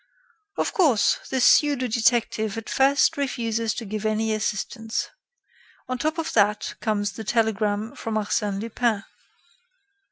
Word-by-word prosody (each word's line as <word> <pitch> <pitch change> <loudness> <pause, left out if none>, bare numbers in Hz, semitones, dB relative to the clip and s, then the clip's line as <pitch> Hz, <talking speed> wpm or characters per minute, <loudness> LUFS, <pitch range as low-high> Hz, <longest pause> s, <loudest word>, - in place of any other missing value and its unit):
"Of - - -1
course, 290 - +3
the 265 - -1
pseudo 280 0 +4
detective 225 -2 +1
at 225 - -6
first 280 +4 +3
refuses 230 -5 -1
to 230 - -5
give 215 +1 -5
any 220 0 0
assistance. 220 +2 -2 0.8
On 255 0 -3
top 310 +4 -1
of 325 -1 -3
that 210 -1 +2
comes 205 -2 0
the 220 - -8
telegram 215 0 0
from 225 -1 -4
Arsène 210 -1 -1
Lupin. 225 -1 -1
225 Hz, 130 wpm, -24 LUFS, 215-245 Hz, 0.8 s, pseudo